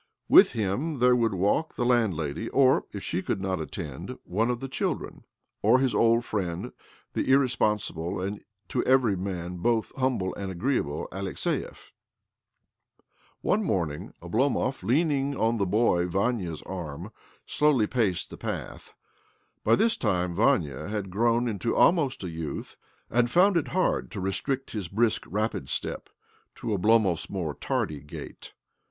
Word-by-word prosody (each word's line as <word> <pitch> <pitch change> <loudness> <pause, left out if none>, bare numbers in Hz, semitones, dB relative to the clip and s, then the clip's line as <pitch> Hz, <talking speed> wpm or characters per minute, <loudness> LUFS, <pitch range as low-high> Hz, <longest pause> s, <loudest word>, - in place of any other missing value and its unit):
With - - +7
him 115 - -1
there 125 0 +5
would 115 -4 +1
walk 100 - +1
t - - -1
landlady— 110 - 0
or, 135 -1 +4
if 100 - -7
she 90 - -1
could - - -2
not 95 -3 -2
attend, 75 -4 -6
one 110 +6 0
the 135 +3 -6
children, 130 - -3 0.4
or 115 +5 +5
his 130 -1 +1
old 115 +1 +3
friend, 90 -5 -3 0.4
the - - -1
irrespo 130 -5 +3
sible 90 -2 -4
and 100 +1 -5 0.3
to 125 - 0
every 130 -6 +4
man 90 -1 -4
both 115 +4 0
humble 130 -8 0
a 100 -1 -5
agreeable 90 - -1
Alexiev. 95 -1 -4 1.5
One 215 +3 +1
morning 85 - -2
Oblom'c 130 +7 0
leaning 140 - +1
on 115 +1 +1
the 100 -3 0
boy 90 -4 +2
Vania's 95 -4 -1
arm, 85 -6 -6 0.3
slowly 145 -7 +3
рас 105 -7 0
the - - -11
path. - - -6 0.7
By - - +5
this 230 +2 +2
time 90 - 0
Vania 75 -1 +1
had 100 -2 -4
groi 115 +4 +2
into 115 +1 -1
almost 150 - +3
a 90 - -3
youth, 80 -2 -5 0.4
and 120 0 +3
found 185 +8 +4
it 165 - +1
hard 185 -8 0
restrict 105 +8 -2
his 105 -5 -4
brisk, 110 +5 +1
rapid 110 +3 -2
step - - -4 0.5
to - - -5
Oblomo 100 -3 +2
more 85 -6 -3
tardy 75 0 -2
gait. 75 +1 -10
105 Hz, 145 wpm, -27 LUFS, 90-125 Hz, 1.5 s, With